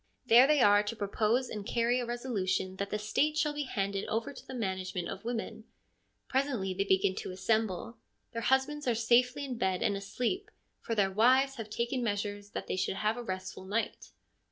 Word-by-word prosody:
There 245 +2 +7
they 300 -2 +4
are 205 -2 +6
to 210 +2 -4
propose 220 +4 +1
and 210 -2 -5
carry 235 +3 +1
a 245 - -3
resolution 200 -6 -2
that 200 0 -3
the 210 - -1
State 290 +9 0
shall 300 -2 +1
be 295 -1 -3
handed 200 -5 -2
over 225 +5 -2
to - - -13
the 260 - -7
management 190 -5 -3
of 195 - -6
women. 225 -1 -4 0.6
Presently 255 -8 0
they 195 +2 -1
begin 190 0 +3
to - - -4
assemble; 210 +3 -1 0.3
their 230 - -4
husbands 265 +4 +1
are 240 - +3
safely 250 +5 +3
in 250 -4 -5
bed 190 -4 +1
and 205 - +2
asleep, 245 - -2 0.3
for 230 - -3
their 195 -2 +2
wives 260 +6 +4
have 220 -2 -6
taken 240 +3 -1
measures 205 -1 -2
that - - -4
they - - -2
should 190 - 0
have 215 +2 0
a 245 - -5
restful 185 -3 -5
night. 210 +4 -2
225 Hz, 195 wpm, -31 LUFS, 200-250 Hz, 0.6 s, There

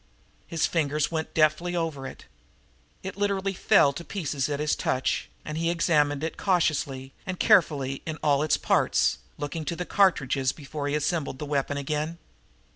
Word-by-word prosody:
His 165 -2 0
fingers 150 -2 0
went 160 -1 -3
deftly 160 +3 +2
over 160 -6 -2
it. - - -11 0.8
It 190 +1 -6
literally 200 -1 0
fell 140 -5 +4
to 170 - -7
pieces 150 -8 -2
at 145 -1 -2
his 150 0 +1
touch, 130 0 -1 0.2
and 155 +1 -4
he 165 0 +1
examined 150 -4 +2
it 160 - -3
cautiously 140 -7 0
and 185 -1 -5
carefully 145 - +3
in 160 -1 -3
all 145 -1 +3
its 155 - +2
parts, - - +2 0.2
looking 145 +2 -4
to 170 - -2
the 180 +1 -4
cartridges 140 -10 +2
before 145 -1 -5
he 145 - 0
assembled 150 -2 -1
the 150 - -5
weapon 145 0 -1
again. 150 +3 -2
155 Hz, 165 wpm, -26 LUFS, 140-170 Hz, 0.8 s, fell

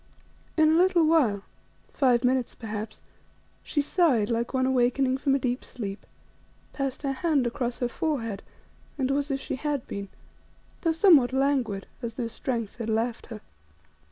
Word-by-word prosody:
In 310 -1 +5
a 320 - +4
little 355 -2 +4
while, 255 -12 +3 0.5
five 250 -4 +3
minutes 255 -1 +1
perhaps, 215 -1 -6 0.6
she 290 - -1
sighed 280 - +2
like 235 +1 -1
one 260 -1 +1
awakening 260 +1 +2
from 275 -1 +2
a - - +3
deep 250 -1 -2
sleep, 200 -4 -7 0.7
passed 275 0 -3
her 275 - 0
hand 280 -1 +1
across 245 0 -2
her 245 - 0
forehead 235 -7 -2 0.6
and 265 -1 0
was 285 +1 0
as 275 -1 -1
she 265 - -4
had 290 -2 -2
been, 200 -1 -6 0.7
though 330 - +2
somewhat 320 -7 +5
languid, 265 -7 0 0.2
as 230 -2 -5
though 240 -2 -2
strength 230 -3 -4
had 230 -2 -4
left 225 +2 -1
her. 220 -3 -8
255 Hz, 155 wpm, -27 LUFS, 230-285 Hz, 0.7 s, In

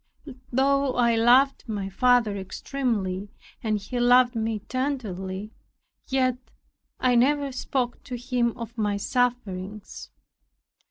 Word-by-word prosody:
Though 275 +1 +2
I 235 -2 +3
loved 250 +3 +4
my 200 -3 -3
father 230 +1 +3
extremely, 200 -1 -3 0.3
and 215 -2 0
he 210 +5 -5
loved 245 0 +5
me 225 -1 -1
tenderly, 215 -7 -3 0.6
yet 255 -2 +1 0.6
I 255 -1 +3
never 280 +3 +3
spoke 255 -1 -2
to 250 - -5
him 245 -1 -1
of 235 0 -7
my 205 -1 0
sufferings. 210 -4 -2
240 Hz, 110 wpm, -25 LUFS, 210-255 Hz, 0.6 s, loved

